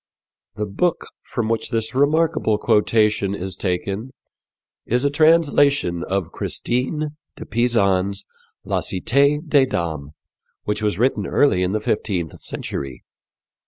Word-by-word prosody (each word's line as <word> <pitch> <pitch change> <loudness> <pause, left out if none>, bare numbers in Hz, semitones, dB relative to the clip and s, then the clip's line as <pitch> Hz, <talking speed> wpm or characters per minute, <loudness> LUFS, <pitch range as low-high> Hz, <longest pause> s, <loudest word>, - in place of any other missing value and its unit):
'" - - -60
The 105 - -2
book 160 - -1 0.2
from 120 -3 -2
which 115 0 -1
this 115 -1 -1
remarkable 150 -4 +2
quotation 105 -2 +2
is 95 -1 -5
taken 100 +5 -2 0.7
is 125 +4 0
a 140 - +2
translation 145 - +3
of 95 -3 -2
Christine 150 +5 -2 0.2
de - - -9
Pisan's 100 -4 +1 0.4
La - - 0
Cité 140 - +1
des 140 -3 +4
Dames, 80 - -3 0.5
which 105 +1 -2
was 105 -4 0
written 125 +5 +1
early 140 -11 +3
in 90 +1 0
the 110 - +1
fifteenth 95 -6 -2
century. 70 -1 -6
110 Hz, 125 wpm, -21 LUFS, 95-140 Hz, 0.7 s, des